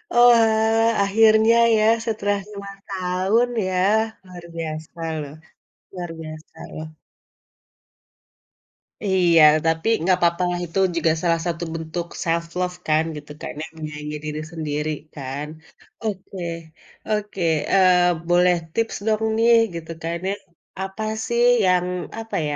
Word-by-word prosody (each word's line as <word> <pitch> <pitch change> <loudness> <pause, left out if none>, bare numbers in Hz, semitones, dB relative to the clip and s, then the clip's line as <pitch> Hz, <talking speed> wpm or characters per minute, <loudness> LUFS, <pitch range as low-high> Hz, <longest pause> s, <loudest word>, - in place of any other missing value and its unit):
Oalah 225 -2 +4
akhirnya 220 +2 +5 0.2
ya 215 - +3 0.2
setelah 205 -3 -1
cuma 200 -1 -8
setahun 190 +5 0 0.2
ya 185 - -2 0.5
luar 180 -2 -11
biasa 160 0 -6 0.2
loh 145 -1 -8 0.6
luar 175 -2 -6
biasa 155 0 -10 0.2
loh. 155 0 -6 2.2
Iya 180 -4 +4 0.2
tapi 160 +2 0 0.2
gapapalah 175 0 +2
itu 170 +3 -3 0.2
juga 165 -1 +2
salah 170 -2 +1
satu 170 0 -2
bentuk 165 +1 -4 0.2
self 170 0 0
love 180 0 -1
kan 155 0 +3
gitu 150 0 -9
karena 150 - -6 0.2
menyayangi 150 -1 -6
diri 155 0 -4
sendiri 150 -2 -3 0.2
kan, 140 +1 -5 0.6
oke 195 -2 -5 0.7
oke, 210 -2 -2 0.3
eee, 180 -3 +4
boleh 175 +1 +4 0.2
tips 230 0 -1
dong 220 0 +1
nih 235 +1 +5 0.2
gitu 165 0 -6
kan 165 +1 -2
ya, - - 0 0.5
apa 195 +3 -5 0.2
sih 235 0 +1 0.2
yang 180 -1 +3 0.3
apa 225 -2 -6
ya, 145 - -2
180 Hz, 120 wpm, -22 LUFS, 160-210 Hz, 2.2 s, akhirnya